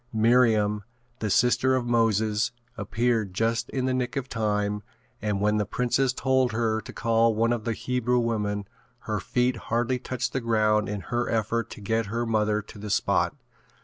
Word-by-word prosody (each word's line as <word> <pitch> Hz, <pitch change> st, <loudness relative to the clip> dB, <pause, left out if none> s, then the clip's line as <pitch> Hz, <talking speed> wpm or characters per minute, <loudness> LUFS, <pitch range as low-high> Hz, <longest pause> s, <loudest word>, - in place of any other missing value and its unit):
Miriam, 110 Hz, -2 st, +3 dB, 0.4 s
the 110 Hz, -, -2 dB
sister 125 Hz, +5 st, +3 dB
of 125 Hz, -2 st, -1 dB
Moses 110 Hz, -2 st, +2 dB, 0.2 s
appeared 115 Hz, -7 st, -1 dB
just 115 Hz, +2 st, 0 dB
in 130 Hz, -1 st, -2 dB
the 130 Hz, -, +1 dB
nick 125 Hz, 0 st, -2 dB
of 135 Hz, -2 st, -2 dB
time 105 Hz, -3 st, -1 dB, 0.4 s
and 105 Hz, -2 st, -1 dB
when 105 Hz, +1 st, +2 dB
the 105 Hz, -, +2 dB
princess 125 Hz, +3 st, +1 dB
told 130 Hz, -1 st, +1 dB
her 110 Hz, -1 st, 0 dB
to -, -, -10 dB
call 115 Hz, -1 st, +2 dB
one 115 Hz, +2 st, +2 dB
of 115 Hz, -3 st, -4 dB
the 115 Hz, -, 0 dB
Hebrew 125 Hz, +1 st, 0 dB
women 105 Hz, -4 st, -1 dB, 0.3 s
her -, -, -2 dB
feet 125 Hz, 0 st, 0 dB
hardly 120 Hz, +2 st, +1 dB
touched 130 Hz, 0 st, -3 dB
the 130 Hz, -, -1 dB
ground 110 Hz, -2 st, +2 dB
in 105 Hz, -1 st, -3 dB
her 120 Hz, +3 st, -2 dB
effort 115 Hz, 0 st, 0 dB
to -, -, -10 dB
get 110 Hz, +2 st, 0 dB
her 115 Hz, +3 st, -2 dB
mother 105 Hz, -2 st, +1 dB
to 105 Hz, -, -13 dB
the 105 Hz, +1 st, -6 dB
spot. -, -, +1 dB
115 Hz, 180 wpm, -26 LUFS, 105-120 Hz, 0.4 s, Miriam